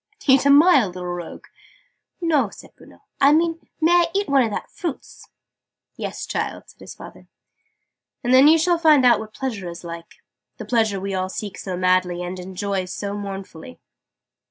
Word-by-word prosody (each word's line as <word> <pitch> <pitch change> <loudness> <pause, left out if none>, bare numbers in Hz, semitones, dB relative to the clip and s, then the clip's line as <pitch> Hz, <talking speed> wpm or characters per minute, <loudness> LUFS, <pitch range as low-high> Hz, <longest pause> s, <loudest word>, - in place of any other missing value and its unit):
"Eat 275 0 +4
a - - +4
mile, 285 - +6
little 180 0 -8
rogue?" 175 -1 -7 0.7
"No," 305 - +1
said - - -15
Bruno. - - -19 0.2
"I 280 +1 +5
mean 330 +1 0
may 325 +1 +3
I 350 -1 +4
eat 400 +1 0
one 280 -1 +3
of 230 - +1
that 205 - -6
fruits?" 340 -8 -7 0.7
"Yes, - - -5
child," - - -4
said - - -20
his - - -11
father: - - -13 1.0
"and 245 +1 +1
then 265 +3 +7
you'll 325 +2 +4
find 305 -5 +5
out 245 - +5
what 220 0 -10
Pleasure 220 -9 -4
is 170 +1 -10
like 170 -1 -9 0.4
the - - -8
Pleasure 220 -5 0
we 195 +1 -4
all 185 0 -2
seek 205 0 -6
so 185 -2 -5
madly, 185 -1 +1
and 180 +1 -6
enjoy 190 +1 -3
so 200 +2 -5
mournfully!" 195 - -8
215 Hz, 175 wpm, -22 LUFS, 185-290 Hz, 1.0 s, then